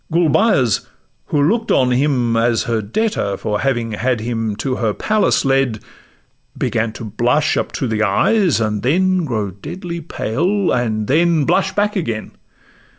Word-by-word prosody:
Gulbeyaz, 160 Hz, -, +2 dB, 0.4 s
who 150 Hz, -, 0 dB
look'd 225 Hz, +8 st, +1 dB
on 125 Hz, -1 st, +3 dB
him 125 Hz, -3 st, +1 dB
as 115 Hz, 0 st, +2 dB
her 115 Hz, -2 st, -1 dB
debtor 105 Hz, -, -1 dB
For 105 Hz, 0 st, -2 dB
having 120 Hz, -4 st, -1 dB
had 120 Hz, +2 st, -1 dB
him 115 Hz, -2 st, -2 dB
to 130 Hz, +3 st, -2 dB
her 110 Hz, -3 st, -1 dB
palace 215 Hz, -7 st, +1 dB
led, 135 Hz, -4 st, +1 dB, 0.8 s
Began 115 Hz, -1 st, -1 dB
to 115 Hz, -, -8 dB
blush 120 Hz, +8 st, +1 dB
up -, -, -2 dB
to 135 Hz, -, -2 dB
the 110 Hz, -1 st, -1 dB
eyes, 150 Hz, -, +2 dB
and 105 Hz, -2 st, -1 dB
then 185 Hz, -, +2 dB
Grow 110 Hz, -7 st, -2 dB
deadly 170 Hz, -, -7 dB
pale, 175 Hz, -, -1 dB
and 110 Hz, -3 st, 0 dB
then 160 Hz, +3 st, +2 dB
blush 190 Hz, +3 st, +1 dB
back 205 Hz, +1 st, +1 dB
again. 115 Hz, -, -3 dB
130 Hz, 150 wpm, -18 LUFS, 110-170 Hz, 0.8 s, on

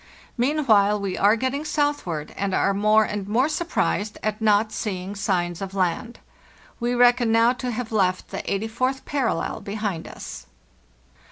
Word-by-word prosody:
Meanwhile 235 Hz, -7 st, +3 dB
we 195 Hz, -2 st, -3 dB
are 205 Hz, +2 st, +4 dB
getting 260 Hz, +5 st, -2 dB
southward, 290 Hz, -, -1 dB
and 195 Hz, -1 st, -1 dB
are 195 Hz, -, +2 dB
more 215 Hz, +2 st, +4 dB
and 205 Hz, -2 st, -4 dB
more 240 Hz, +7 st, +2 dB
surprised 305 Hz, -10 st, -1 dB
at 215 Hz, +1 st, -2 dB
not 215 Hz, 0 st, +3 dB
seeing 190 Hz, -3 st, -4 dB
signs 180 Hz, -4 st, -1 dB
of 195 Hz, 0 st, -5 dB
land. 190 Hz, +5 st, -1 dB, 0.6 s
We 240 Hz, 0 st, 0 dB
reckon 245 Hz, -1 st, +4 dB
now 230 Hz, +2 st, +4 dB
to 255 Hz, 0 st, -4 dB
have 235 Hz, -1 st, -4 dB
left 185 Hz, -4 st, +1 dB
the -, -, -4 dB
eighty 200 Hz, +3 st, -1 dB
fourth 255 Hz, +4 st, -2 dB
parallel 255 Hz, -, -1 dB
be 200 Hz, -, -6 dB
hind 205 Hz, -6 st, -3 dB
us. 60 Hz, -, -9 dB
215 Hz, 160 wpm, -24 LUFS, 195-245 Hz, 0.6 s, are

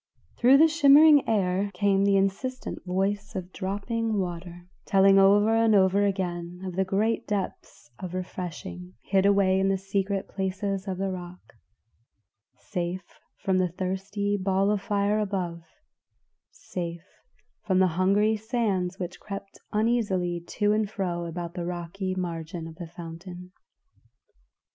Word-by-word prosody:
Through 255 Hz, +3 st, +6 dB
the 320 Hz, +3 st, +7 dB
shimmering 300 Hz, -2 st, +6 dB
air 195 Hz, -2 st, +1 dB
came 195 Hz, 0 st, +2 dB
the 200 Hz, -1 st, +4 dB
insistent 200 Hz, +7 st, -2 dB
voice 200 Hz, +3 st, -1 dB
of 185 Hz, -1 st, -5 dB
dropping 215 Hz, +3 st, -2 dB
water, 175 Hz, -1 st, -5 dB, 0.2 s
telling 195 Hz, -1 st, +5 dB
over 205 Hz, +3 st, +5 dB
and 225 Hz, -1 st, +4 dB
over 195 Hz, +1 st, +4 dB
again 180 Hz, -3 st, -3 dB
of 190 Hz, +1 st, -1 dB
great 215 Hz, +4 st, 0 dB
depths 195 Hz, -, -5 dB
of 185 Hz, -1 st, -6 dB
refreshing 155 Hz, -, -6 dB
hid 195 Hz, 0 st, +2 dB
away 195 Hz, -1 st, +3 dB
in 195 Hz, -, +2 dB
the 195 Hz, -, +2 dB
secret 195 Hz, 0 st, -2 dB
places 195 Hz, 0 st, -3 dB
of 185 Hz, -2 st, -3 dB
the 195 Hz, 0 st, -1 dB
rock, 180 Hz, -1 st, -9 dB, 1.0 s
safe 180 Hz, -1 st, -5 dB, 0.2 s
from 190 Hz, -1 st, +2 dB
the 185 Hz, -, +2 dB
thirsty 195 Hz, +3 st, -2 dB
ball 195 Hz, +1 st, +2 dB
of 210 Hz, -2 st, 0 dB
fire 205 Hz, 0 st, +1 dB
above, 185 Hz, -5 st, -2 dB, 0.9 s
safe 170 Hz, -1 st, -6 dB, 0.6 s
from 190 Hz, -2 st, +1 dB
the 185 Hz, 0 st, +4 dB
hungry 200 Hz, +5 st, +3 dB
sands 210 Hz, -5 st, -1 dB
which 180 Hz, -1 st, -6 dB
crept 195 Hz, -1 st, -8 dB
uneasily 205 Hz, -6 st, 0 dB
to 205 Hz, -1 st, +1 dB
and 215 Hz, -1 st, 0 dB
fro 180 Hz, -5 st, -3 dB
about 170 Hz, 0 st, -5 dB
the 175 Hz, -, -4 dB
rocky 180 Hz, +2 st, -4 dB
margin 170 Hz, -1 st, -4 dB
of 165 Hz, -, -8 dB
the 175 Hz, -2 st, -7 dB
fountain. 175 Hz, +2 st, -9 dB
190 Hz, 135 wpm, -26 LUFS, 180-205 Hz, 1.0 s, the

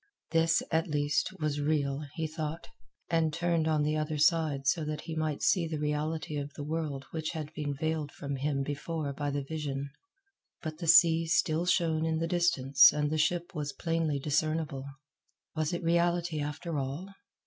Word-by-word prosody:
This, 165 Hz, 0 st, +3 dB
at 160 Hz, 0 st, +1 dB
least, 145 Hz, -1 st, +1 dB
was 150 Hz, -2 st, -1 dB
real, 145 Hz, -2 st, 0 dB
he 160 Hz, -, -2 dB
thought, 155 Hz, +1 st, -4 dB, 0.4 s
and 165 Hz, -2 st, +2 dB
turned 170 Hz, 0 st, 0 dB
on 155 Hz, -2 st, +2 dB
the 150 Hz, +1 st, +1 dB
other 155 Hz, 0 st, -2 dB
side 155 Hz, -3 st, +2 dB
so 160 Hz, +3 st, +2 dB
that 150 Hz, 0 st, -3 dB
he 160 Hz, -, -6 dB
might 155 Hz, -2 st, -2 dB
see 175 Hz, -4 st, +3 dB
the 160 Hz, -1 st, -3 dB
reality 150 Hz, +1 st, -2 dB
of 145 Hz, 0 st, -4 dB
the 145 Hz, -, -5 dB
world 150 Hz, -3 st, -3 dB
which 160 Hz, 0 st, -3 dB
had 155 Hz, -2 st, -5 dB
been 145 Hz, -2 st, -3 dB
veiled 155 Hz, 0 st, -2 dB
from 140 Hz, -1 st, -5 dB
him 140 Hz, 0 st, -1 dB
before 145 Hz, +1 st, -3 dB
by 145 Hz, +1 st, -2 dB
the 140 Hz, 0 st, -2 dB
vision. 140 Hz, -2 st, -4 dB, 0.7 s
But 155 Hz, -1 st, -5 dB
the 170 Hz, -, -4 dB
sea 165 Hz, -1 st, +6 dB
still 165 Hz, +1 st, +1 dB
shone 165 Hz, -3 st, +2 dB
in 160 Hz, 0 st, 0 dB
the 165 Hz, -, 0 dB
distance 145 Hz, -6 st, +5 dB
and 150 Hz, 0 st, -1 dB
the 155 Hz, -, 0 dB
ship 175 Hz, +3 st, 0 dB
was 150 Hz, -3 st, -3 dB
plainly 165 Hz, -3 st, -1 dB
discernible. 150 Hz, -1 st, -1 dB, 0.7 s
Was 155 Hz, 0 st, 0 dB
it 175 Hz, 0 st, -3 dB
reality, 170 Hz, -1 st, +1 dB
after 150 Hz, +2 st, -3 dB
all? 145 Hz, +9 st, -5 dB
155 Hz, 180 wpm, -30 LUFS, 145-165 Hz, 0.7 s, sea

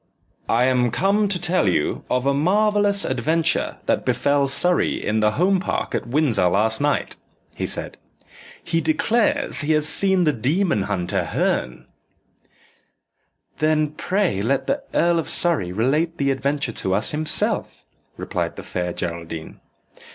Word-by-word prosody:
"I 120 Hz, +2 st, +3 dB
am 125 Hz, -1 st, +2 dB
come 200 Hz, -, +1 dB
to 195 Hz, -2 st, 0 dB
tell 175 Hz, -, +1 dB
you 80 Hz, -4 st, -1 dB
of 125 Hz, +1 st, 0 dB
a 140 Hz, -, +2 dB
marvellous 205 Hz, +5 st, +2 dB
adventure 155 Hz, +6 st, 0 dB
that -, -, 0 dB
befell 140 Hz, -1 st, +1 dB
Surrey 175 Hz, +6 st, +4 dB
in 110 Hz, +1 st, -2 dB
the 105 Hz, 0 st, +2 dB
Home 185 Hz, -, +2 dB
Park 185 Hz, -, -3 dB
at -, -, -3 dB
Windsor 120 Hz, -, +2 dB
last 110 Hz, +7 st, +1 dB
night," 145 Hz, 0 st, -1 dB, 0.4 s
he -, -, -4 dB
said. -, -, -2 dB, 0.7 s
"He 165 Hz, -, -1 dB
declares 240 Hz, -, 0 dB
he 155 Hz, +1 st, +1 dB
has 150 Hz, 0 st, +1 dB
seen 190 Hz, +2 st, +2 dB
the 150 Hz, -3 st, +2 dB
demon 140 Hz, -, 0 dB
hunter, 95 Hz, -1 st, -1 dB
Herne." 65 Hz, -, -2 dB, 1.7 s
"Then 155 Hz, -1 st, +1 dB
pray 180 Hz, -, -1 dB
let 135 Hz, +5 st, 0 dB
the 275 Hz, +1 st, -1 dB
Earl 170 Hz, 0 st, +2 dB
of 165 Hz, -, -2 dB
Surrey 160 Hz, -, +3 dB
relate 150 Hz, -, 0 dB
the 140 Hz, -1 st, +1 dB
adventure 140 Hz, -1 st, -2 dB
to 95 Hz, -2 st, -2 dB
us 105 Hz, -, +1 dB
himself," 155 Hz, +1 st, -2 dB, 0.3 s
replied -, -, -4 dB
the -, -, -9 dB
Fair 90 Hz, -1 st, -4 dB
Geraldine. 85 Hz, -2 st, -6 dB
145 Hz, 145 wpm, -21 LUFS, 110-175 Hz, 1.7 s, Surrey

